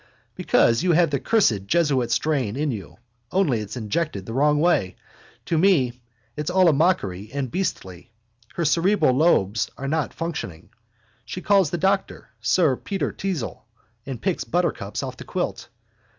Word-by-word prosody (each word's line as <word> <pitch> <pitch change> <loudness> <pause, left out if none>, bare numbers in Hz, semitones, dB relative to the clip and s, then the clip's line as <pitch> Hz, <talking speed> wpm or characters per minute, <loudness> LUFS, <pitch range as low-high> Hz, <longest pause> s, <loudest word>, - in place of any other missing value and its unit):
Because 115 +2 +2
you 180 -1 +2
have 165 -1 +3
the 140 - 0
cursed 115 - +2
jesuit 145 -7 +2
strain 125 -3 0
in 145 +1 -1
you, 105 -6 -8 0.3
only 160 - +2
it's 105 +3 -6
injected 110 - -2
the 115 - -6
wrong 150 +3 +3
way. 150 - +2 0.5
To 165 - 0
me 135 -10 +2 0.3
it's 150 +2 -3
all 185 0 +4
a - - +3
mockery 110 - 0
and 135 -3 -3
beastly. 95 - -4 0.5
Her 170 - -1
cerebral 165 -1 +3
lobes 115 - +2
are 135 - -5
not 155 +1 -1
functioning. 125 - -6 0.5
She 150 - -6
calls 195 -5 +4
the 175 - -2
doctor 195 +3 -1
sir 155 -8 +2
Peter 195 -1 -3
Teazle 180 -11 -4 0.4
and 130 -3 -6
picks 185 +5 -1
buttercups 170 - -2
off - - -6
the - - -8
quilt. - - -4
150 Hz, 155 wpm, -23 LUFS, 115-175 Hz, 0.5 s, all